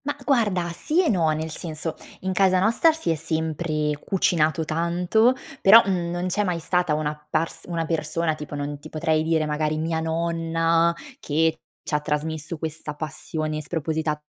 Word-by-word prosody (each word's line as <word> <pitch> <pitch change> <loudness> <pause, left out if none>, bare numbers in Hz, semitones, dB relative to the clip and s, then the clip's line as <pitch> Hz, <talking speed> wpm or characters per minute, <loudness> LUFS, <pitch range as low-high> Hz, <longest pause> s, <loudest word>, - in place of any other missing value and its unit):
Ma 290 0 -1
guarda, 210 -10 +2
sì 315 - +1
e 330 - +2
no, 170 -6 +2
nel 155 +1 -2
senso: 155 0 -4 0.3
in 190 0 -2
casa 185 -1 +4
nostra 230 - +4
si 320 - -2
è - - +1
sempre 160 -1 -1
cucinato 160 -4 +1
tanto, 175 +9 +2 0.3
però 220 +4 +9
non 175 -2 -1
c'è 210 +3 0
mai 180 -4 -1
stata 175 -1 +1
una 150 0 -2
pars 165 +1 -2
una 170 -2 -2
persona, 160 0 -1
tipo 150 -1 -7
non 145 0 -4
ti - - -11
potrei 155 0 +1
dire 160 -1 +1
magari 155 0 -1
mia 160 +1 -1
nonna 165 0 +1 0.3
che 160 +2 +1 0.2
c'ha 150 - 0
trasmesso 155 +2 -3
questa 155 -1 -5
passione 155 0 -4
spropositata 155 -1 -2
160 Hz, 160 wpm, -24 LUFS, 155-175 Hz, 0.3 s, però